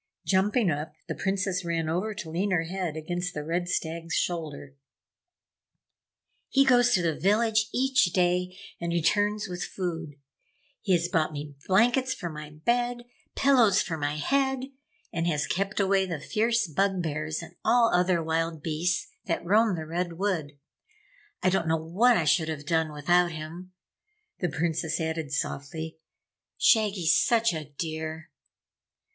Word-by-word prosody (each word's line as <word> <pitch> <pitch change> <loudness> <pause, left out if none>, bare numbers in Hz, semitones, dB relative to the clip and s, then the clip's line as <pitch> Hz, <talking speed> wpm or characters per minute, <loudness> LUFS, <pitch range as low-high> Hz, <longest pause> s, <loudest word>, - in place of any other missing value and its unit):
Jumping 200 +1 +2
up, 150 +1 -4
the - - -2
Princess 190 -1 -1
ran 165 -2 -1
over 185 +7 -1
to 185 -6 -7
lean 185 +5 0
her 175 -4 +2
head 175 -2 -4
against 175 +3 -3
the 150 - -3
Red 175 +3 -2
Stag's 165 0 -2
shoulder. 150 -5 -3 1.7
"He 275 0 +4
goes 245 -2 +5
to 180 - +1
the 165 -2 +1
village 215 +5 +2
each 265 -2 +3
day 180 +1 0 0.2
and 170 0 -3
returns 205 +5 +1
with 180 -1 -4
food. 165 -5 -4 0.7
He 195 - +1
has 175 -1 +2
brought 160 -3 +1
me 145 -1 -6
blankets 245 +7 +3
for 175 - -5
my 150 -1 -8
bed, 240 +10 -1 0.3
pillows 240 -8 +4
for 165 - -3
my 145 -1 -2
head, 265 - +1 0.5
and 165 0 -1
has 150 -3 0
kept 195 +8 -2
away 195 -1 +2
the 165 -4 -3
fierce 230 +7 +1
Bug 190 +3 0
bears 155 0 -3
and - - -11
all 235 -1 +4
other 180 -1 +2
wild 160 -1 -1
beasts 165 +3 -1 0.2
that 170 -2 -2
roam 210 +2 +3
the 160 -2 -5
Red 175 +2 -2
Wood. 165 -6 -2 0.9
I 185 - +4
don't 190 -3 0
know 160 0 +2
what 195 +10 +3
I 165 - 0
should 160 +2 +2
have 150 -2 -5
done 160 0 +1
without 175 +4 +2
him!" 165 +4 -8 0.7
The 180 - 0
Princess 160 +1 -1
added 160 -3 -3
softly, 160 +3 -4 0.6
"Shaggy's 200 -7 +4
such 230 -3 +3
a 155 -2 -4
dear!" 160 -1 -5
175 Hz, 150 wpm, -27 LUFS, 160-200 Hz, 1.7 s, goes